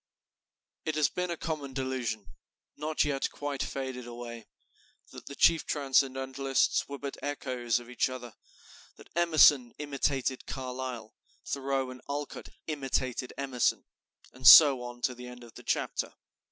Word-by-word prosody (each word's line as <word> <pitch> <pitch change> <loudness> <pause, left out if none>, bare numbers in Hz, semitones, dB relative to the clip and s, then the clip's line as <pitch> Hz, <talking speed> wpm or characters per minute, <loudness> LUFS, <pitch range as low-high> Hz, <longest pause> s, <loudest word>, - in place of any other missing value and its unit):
It 155 - -2
has 150 -3 +3
been 180 0 -3
a 170 - -3
common 150 -5 -4
delusion, 125 -7 -3 0.5
not 155 +1 0
yet 140 -2 -1
quite 145 -2 -4
faded 130 -2 -4
away, 120 -2 -8 0.6
that - - -11
the 140 - -7
chief 165 +2 +4
Transcendentalists 135 -1 +1
were 140 - -5
but 140 0 -6
echoes 125 -4 -1
of 120 - -13
each 125 +1 0
other, 125 -3 -8 0.6
that - - -17
Emerson 150 -7 +5
imitated 140 -2 -1
Carlyle, 125 -4 -5 0.3
Thoreau 135 -1 -2
and 125 - -11
Alcott 145 0 -5 0.2
imitated 130 -4 -2
Emerson, 135 -3 0 0.5
and 130 0 0
so 140 -5 +10
on 120 0 -8
to 125 - +1
the 125 0 -10
end 125 0 -11
of 115 - -14
the - - -11
chapter. - - -2
130 Hz, 140 wpm, -30 LUFS, 125-145 Hz, 0.6 s, so